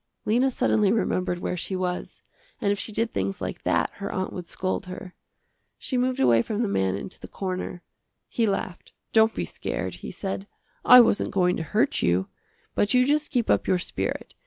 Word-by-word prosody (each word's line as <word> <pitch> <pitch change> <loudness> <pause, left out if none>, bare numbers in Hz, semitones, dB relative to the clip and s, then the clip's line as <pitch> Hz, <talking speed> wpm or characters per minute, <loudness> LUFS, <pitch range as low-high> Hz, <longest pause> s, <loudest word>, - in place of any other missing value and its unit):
Lena 245 +5 +3
suddenly 210 -5 +2
remembered 185 -5 0
where 175 - -3
she 185 +2 -3
was, 180 -1 -4 0.4
and 205 -4 +1
if 205 - -1
she 215 - -3
did 225 +2 -1
things 95 0 -2
like - - -5
that - - +1
her 200 0 -4
aunt 185 0 -3
would 180 -2 -6
scold 185 0 -3
her. 185 0 -8 0.6
She 260 - -4
moved 255 +1 +1
away 120 -3 +5
from 215 - -2
the - - 0
man 95 - +1
into 100 - -7
the - - -9
corner. 185 -2 -4 0.4
He 230 -2 0
laughed, 190 -2 -3 0.2
"Don't 220 0 +5
be - - -2
scared," - - -4
he - - -8
said, 195 0 -5 0.4
"I 250 0 +10
wasn't 225 - +2
going 180 -2 +2
to - - -3
hurt 215 - +1
you. 90 +2 +1 0.4
But 205 +4 +2
you 250 0 +5
just 300 +2 +1
keep 245 -6 0
up - - +2
your 185 - +3
spirit. 95 - -4
195 Hz, 195 wpm, -25 LUFS, 180-225 Hz, 0.6 s, I